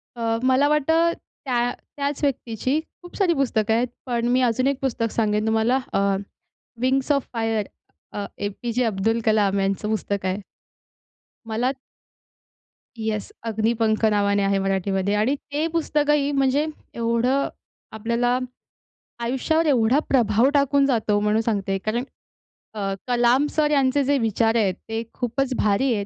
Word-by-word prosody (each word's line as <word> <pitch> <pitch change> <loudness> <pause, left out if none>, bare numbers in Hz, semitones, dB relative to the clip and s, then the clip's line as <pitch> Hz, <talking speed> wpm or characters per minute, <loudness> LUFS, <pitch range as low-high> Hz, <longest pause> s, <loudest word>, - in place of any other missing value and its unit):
अ, 230 -1 -1
मला 260 +2 +4
वाटतं, 320 +3 +3 0.3
त्या 245 -2 +1 0.3
त्याच 280 0 -2
व्यक्तीची 255 +1 0 0.2
खूप 350 - -12
सारी 370 -4 +3
पुस्तकं 225 -7 +1
आहेत. 235 +2 +2 0.2
पण 240 -2 -1
मी 255 +1 +3
अजून 250 +1 +2
एक 275 -1 0
पुस्तक 230 -4 -1
सांगेन 215 -1 0
तुम्हाला, 225 +4 +2
अ, - - +2 0.8
"wings 265 +2 +1
of 280 -2 +1
fire" 225 -2 0 0.7
A. 205 - -2
P. 235 +4 -5
जे. 250 +2 +1
अब्दुल 225 +2 0
कलाम 205 -3 +3
यांचं 195 +2 -1
पुस्तक 200 -3 -2
आहे. 185 +2 -1 1.1
मला 235 +4 0 1.2
येस, 220 -2 -3
"अग्निपंख" 225 0 0
नावाने 200 -1 +2
आहे 195 0 +2
मराठीमध्ये 195 0 0
आणि 220 +7 +2 0.2
ते 295 +2 0
पुस्तकही, 295 -3 +1
म्हणजे 275 +1 +2 0.3
एवढं 235 +4 +1 0.4
आपल्याला 235 +3 0 0.8
आयुष्यावर 265 +7 0
एवढा 255 -2 +3
प्रभाव 235 -1 +3
टाकून 280 -1 +3
जातो, 220 -6 +1
म्हणून 210 +1 +2
सांगते. 200 -4 -1
कारण 215 +5 -2 0.7
अ, 215 - -7 0.3
कलाम 245 +3 +3
सर 300 -1 +1
यांचे 275 -1 +3
जे 280 +1 +2
विचार 225 0 +1
आहेत, 205 -5 +2 0.2
ते 225 0 -2
खूपच 260 +2 -1
भारी 215 +5 +2
आहेत 205 -2 -2
235 Hz, 140 wpm, -23 LUFS, 215-270 Hz, 1.2 s, मला